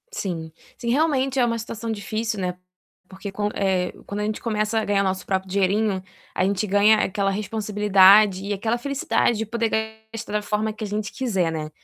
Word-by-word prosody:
Sim 170 - -4 0.3
sim 235 -1 -4
realmente 270 -1 +1
é 245 - +5
uma 230 -1 0
situação 225 0 -5
difícil, 215 +1 -3
né, 180 -1 -2 0.5
porque 195 +1 -8
com, 205 +1 -1
eh, 190 -2 0 0.2
quando 205 +1 -3
a - - -1
gente 215 0 -3
começa 215 -1 0
a 220 - -2
ganhar 200 -1 +2
nosso 190 -1 -2
próprio 190 0 -1
dinheirinho, 200 +1 +1 0.3
a 185 - +1
gente 200 +1 0
ganha 205 +2 +5
aquela 195 +1 0
responsabilidade 205 -1 +4
e 205 - -1
aquela 220 +4 -1
felicidade 265 -3 0
de 225 - -2
poder 230 +1 -1 0.4
gastar 225 -1 -6
da 210 - +1
forma 210 +1 -1
que 220 - -8
a - - -2
gente 210 0 -3
quiser, 195 -10 0
né. 155 -1 -4
210 Hz, 195 wpm, -23 LUFS, 195-225 Hz, 0.5 s, é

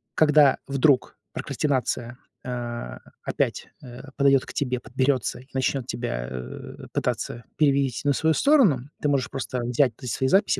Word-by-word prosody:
когда 150 -3 +5
вдруг 135 -1 +2 0.2
прокрастинация, 125 -4 -2 0.3
а, 120 -1 -5 0.3
опять, - - -1 0.2
э, 125 -1 -10
подойдет 140 -1 +4
к - - -8
тебе, 125 -3 -1
подберется 130 0 0
и 130 - -19
начнет 130 -1 0
тебя, - - -3
э, 65 0 -8
пытаться 120 - -2
перевить 140 -5 +2
на 145 - +4
свою 160 +4 +2
сторону, 180 - +4
ты 145 - +1
можешь 135 -4 +1
просто 125 -2 -4
взять 125 +2 +2
свои 130 +1 -1
записи 195 +9 +3
130 Hz, 140 wpm, -25 LUFS, 120-140 Hz, 0.3 s, когда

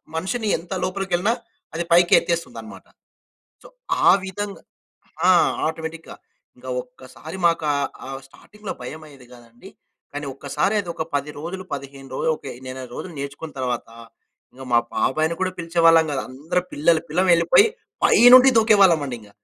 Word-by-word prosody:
మనిషిని 215 +7 -2
ఎంత 175 +3 -8
లోపలికెళ్ళినా 195 +2 0 0.4
అది 170 - -1
పైకి 175 0 +5
ఎత్తేస్తుందనమాట. 170 -1 -5 0.8
సో, - - -14 0.4
ఆ - - +9 0.2
విధంగా 200 +1 -6 0.7
ఆ! - - +8 0.4
ఆటోమేటిక్‌గా. 160 0 -6 0.4
ఇంకా - - -12
ఒక్కసారి - - -12
మాకు 165 -2 +1
ఆహ్, 140 -1 -1 0.2
ఆహ్, 135 0 -7
స్టార్టింగ్‌లో 210 +8 -10
భయమయ్యేది 140 -1 -10
గాదండి, 120 -1 -16 0.4
కానీ 145 0 -5
ఒక్కసారది 170 +8 -1
ఒక 160 - -3
10 145 +1 -1
రోజులు, 185 +4 -6
15 135 -1 -9
రోజులు, 160 - 0
ఒక - - -29 0.2
నెల 130 0 -7
రోజులు 180 - -7
నేర్చుకున్న 140 +3 -7
తర్వాతా, 120 -2 -4 0.6
ఇంగ 130 - -13
మా - - +7 0.2
బాబాయిని 155 +4 +1
కూడా 185 0 0
పిలిచేవాళ్ళం 165 -1 +4
గాదు. 135 - -2
అందరు 150 +7 -2
పిల్లలు 160 +2 +2
పిల్లలు 180 +4 +1
వెళ్ళి, 170 0 +3
పొయ్యి 435 +9 +7 0.4
పై - - +5 0.2
నుండి 255 +1 +9
దూకేవాళ్ళమండింగ. 165 - +3
160 Hz, 140 wpm, -22 LUFS, 140-185 Hz, 0.8 s, ఆ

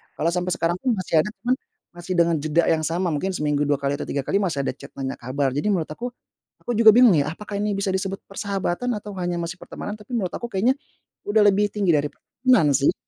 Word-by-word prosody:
Kalau 165 - 0
sampai 180 +1 -1
sekarang 170 +1 0
pun 250 +1 +1
masih 185 -4 +1
ada, 155 - +1 0.2
cuman, 250 +1 +2 0.4
masih 175 +1 -5
dengan 170 -1 +4
jeda 155 +3 +2
yang 160 -1 +2
sama, 175 +1 0
mungkin 150 +6 -1
seminggu 150 -2 0
2 145 - +4
kali 140 0 -1
atau - - -4
3 140 - -2
kali, 200 - +1
masih 165 -8 -1
ada - - -1
chat - - -12
nanya 135 -1 -3
kabar. 130 +2 -2
Jadi 145 +10 0
menurut 180 -6 +1
aku, 245 +10 -5 0.5
aku 245 - -4
juga 225 0 +7
bingung, 235 -1 +7
ya, 150 -2 +2
apakah 205 +6 -8
ini 205 -1 0
bisa 195 -1 -1
disebut 190 0 -2
persahabatan 200 +2 -2
atau 205 0 -8
hanya 175 0 -1
masih 170 +2 -5
pertemanan? 205 - -6
Tapi 210 -1 -13
menurut 185 -5 -2
aku 240 - -5
kayaknya 230 +5 +2 0.6
udah 215 +1 +4
lebih 205 +1 +4
tinggi 200 -4 +1
dari 145 -1 +1
pertemanan, 245 - +2
sih. 140 +1 +3
180 Hz, 230 wpm, -23 LUFS, 155-205 Hz, 0.6 s, juga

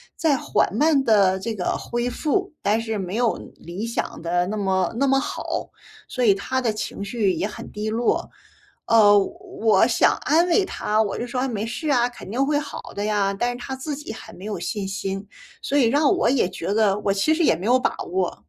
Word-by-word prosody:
在 315 -4 +2
缓 - - 0
慢 290 +2 +3
地 195 -5 +4
这 225 +3 -3
个 180 - -1
恢 240 +1 -2
复， 375 +9 -1
但 215 +3 +2
是 225 -1 -3
没 190 0 -4
有 240 -2 +2 0.2
理 175 +6 -6
想 230 - -3
得 175 +1 0
那 215 +3 -3
么 190 -2 +1
那 275 - +3
么 270 0 +4
好， 270 - -4 0.4
所 250 -1 0
以 205 - +6
他 260 +7 -2
的 225 -3 0
情 210 -1 -5
绪 200 -2 0
也 - - -1
很 210 - -9
低 210 +1 -3
落。 230 +2 0 0.5
呃， 205 -2 +6
我 195 - 0 0.3
我 220 -1 +4
想 - - +3
安 330 +4 +3
慰 390 +4 +4
他， 215 - 0
我 200 -3 -1
就 240 - -3
说： 250 +1 -2
“啊， 265 - 0
没 220 -3 -3
事 295 +7 -4
啊， 245 -3 +3
肯 240 - -11
定 260 +4 +1
会 290 0 +1
好 300 - -6 0.2
的 205 - -2
呀。” 205 -2 +1
但 245 +2 0
是 245 - -6
他 265 +2 -5
自 280 +2 -4
己 295 -6 -7
很 220 0 -11
没 185 - -10
有 215 - -4
信 205 -3 -3
心， 195 0 -4 0.4
所 280 - -2
以 265 - +5
让 285 +5 +3
我 - - +2
也 255 -8 +2
觉 185 +1 -3
得 210 -3 +3
我 200 - 0
其 200 +11 +2
实 335 - 0
也 165 - +4
没 180 +5 -7
有 250 +2 +4
把 - - 0 0.2
握。 185 -1 -2
220 Hz, 245 characters per minute, -23 LUFS, 200-260 Hz, 0.5 s, 以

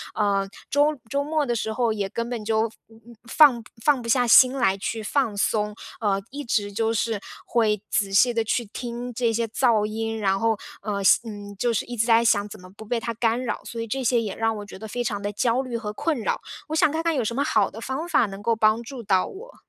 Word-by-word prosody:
呃， 200 -2 +1 0.2
周 290 0 +2
周 280 0 0
末 305 0 0
的 240 -2 -1
时 220 0 -2
候 230 -1 +1
也 200 -2 -3
根 235 +1 -4
本 235 -3 -4
就， 220 +1 +1 0.2
嗯， 225 +1 -17 0.2
放 260 -7 +6
不 - - -19
放 285 -4 +3
不 230 - -6
下 245 0 +3
心 255 +2 +8
来 195 -8 +2
去 220 +3 -3
放 220 -2 0
松， 210 0 0 0.3
呃， 195 -2 +1
一 290 +1 -5
直 205 -3 -1
就 225 +1 0
是 225 -1 -1 0.3
会 215 -4 +1
仔 195 -2 0
细 240 +4 +5
地 230 -1 +1
去 235 +1 -1
听 240 +3 -6
这 235 -1 +1
些 230 +1 0
噪 225 -2 +2
音， 225 +1 -3
然 195 -1 +1
后， 225 -2 +1 0.2
呃 205 0 -3 0.3
嗯， 205 -2 -8
就 240 +3 +1
是 - - -1
一 245 - -6
直 225 0 +1
在 230 0 +5
想 205 -2 +3
怎 210 - -10
么 185 - -13
不 220 - -10
被 235 +2 -1
它 230 0 -4
干 230 +2 0
扰。 225 - -3
所 230 - -7
以 - - -3
这 265 +4 -2
些 235 0 +3
也 205 -3 -4
让 225 0 0
我 205 - -7
觉 195 - -10
得 220 - -7
非 245 +3 -3
常 205 -3 -2
地 205 +1 -2
焦 235 +4 +1
虑 245 -3 -4
和 210 -2 -5
困 305 +2 -1
扰， - - -1 0.3
我 315 - -2
想 315 -2 +4
看 325 +1 -2
看 330 -2 +1
有 255 - +1
什 235 +2 -2
么 280 - +1
好 315 - +2
的 225 - -10
方 265 +8 -4
法 235 - +4
能 195 0 -8
够 230 +1 +1
帮 220 +1 +3
助 245 -1 -8
到 190 -2 +2
我？ 475 +6 -11
225 Hz, 270 characters per minute, -24 LUFS, 210-245 Hz, 0.3 s, 心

